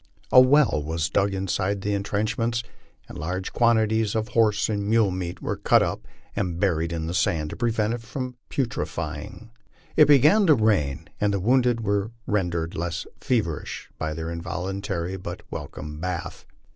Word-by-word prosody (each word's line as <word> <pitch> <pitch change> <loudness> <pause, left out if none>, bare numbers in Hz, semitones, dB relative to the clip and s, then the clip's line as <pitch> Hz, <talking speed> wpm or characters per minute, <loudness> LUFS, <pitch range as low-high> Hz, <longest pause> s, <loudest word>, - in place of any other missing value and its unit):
A 125 - +9
well 130 - +4
was 80 +1 -2
dug 100 0 +2
inside 95 +1 -1
the 105 +1 -1
intrenchments, 115 +4 -1 0.4
and - - -9
large 90 +4 -3
quantities 110 -2 +2
of 110 +1 -1
horje 105 -2 +2
and 100 -2 -2
mule 110 -3 +4
meat 90 -1 -5
were - - -1
cut - - +4
off - - -2 0.4
and 90 -4 -2
buried 85 -4 +1
in 80 -1 -3
the 85 - -3
sand 80 -5 0
to - - -5
prevent 115 -2 0
it 120 - -4
from 125 +2 -5
putrefy 130 -4 -2
ing. 115 0 -12 0.4
It 150 - +7
began 150 - +6
to 155 - +7
rain, 80 - +1
and 105 0 +2
the 100 - 0
wounded 120 +3 +2
were 100 -1 0 0.2
rendered 85 -5 -1
less 85 0 -3
feverish 105 - -2
by 80 -1 -2
thei.: 80 +1 -4
involuntary 90 +2 -3
but 90 - -7
welcome 75 0 -7
bath. 90 0 -5
100 Hz, 165 wpm, -25 LUFS, 85-115 Hz, 0.4 s, A